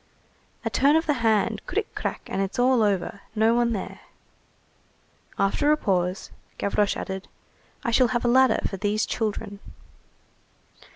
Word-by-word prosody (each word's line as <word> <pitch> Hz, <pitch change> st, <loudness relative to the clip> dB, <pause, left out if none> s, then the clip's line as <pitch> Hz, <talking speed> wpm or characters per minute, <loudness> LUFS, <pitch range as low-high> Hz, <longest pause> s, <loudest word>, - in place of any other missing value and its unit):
"A -, -, +1 dB
turn 280 Hz, +3 st, +4 dB
of 320 Hz, +1 st, +2 dB
the 295 Hz, -, +2 dB
hand, 220 Hz, -3 st, +1 dB
cric, -, -, -2 dB
crac, -, -, -4 dB
and 195 Hz, -, -3 dB
it's 195 Hz, 0 st, -3 dB
all 250 Hz, -1 st, +3 dB
over, 200 Hz, -1 st, 0 dB
no 220 Hz, +1 st, +3 dB
one 240 Hz, 0 st, +2 dB
there." 205 Hz, -4 st, -5 dB, 1.4 s
After 290 Hz, +10 st, +2 dB
a 305 Hz, -, +4 dB
pause, 185 Hz, -5 st, -1 dB, 0.3 s
Gavroche 200 Hz, 0 st, 0 dB
added:— 190 Hz, 0 st, -5 dB, 0.6 s
"I 235 Hz, -, -1 dB
shall 250 Hz, +2 st, +4 dB
have 240 Hz, 0 st, -1 dB
a -, -, +3 dB
ladder 260 Hz, +2 st, +4 dB
for 195 Hz, -, -6 dB
these 210 Hz, +2 st, 0 dB
children." 210 Hz, -2 st, -3 dB
220 Hz, 150 wpm, -25 LUFS, 200-245 Hz, 1.4 s, turn